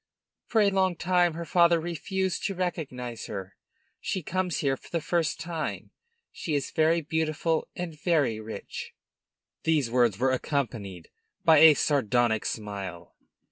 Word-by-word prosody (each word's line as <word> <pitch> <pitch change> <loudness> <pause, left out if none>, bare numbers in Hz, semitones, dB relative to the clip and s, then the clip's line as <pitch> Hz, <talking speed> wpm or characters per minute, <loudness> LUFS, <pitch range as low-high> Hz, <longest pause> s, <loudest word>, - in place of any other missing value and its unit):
For 225 - +3
a 200 -1 +4
long 190 -2 +2
time 175 -1 +2
her 170 0 -5
father 170 +1 +4
refused 175 +3 -2
to 195 - -1
recognize 130 -10 -4
her. 95 -2 -6 0.4
She 190 - -3
comes 180 +1 -1
here 135 -2 +1
for - - -17
the 170 - -1
first 165 +1 0
time. 165 -1 -4 0.4
She 155 - -3
is 140 - -2
very 160 +1 +3
beautiful 160 +1 -1
and 165 -4 -6
very 145 -11 +2
rich." 110 -2 -7 0.7
These 150 -7 +1
words 120 -5 +3
were 130 +3 +2
accompanied 115 - -3 0.3
by 160 -2 +7
a 160 -1 +9
sardonic 120 -6 +1
smile. 100 -5 -6
155 Hz, 140 wpm, -27 LUFS, 120-170 Hz, 0.7 s, a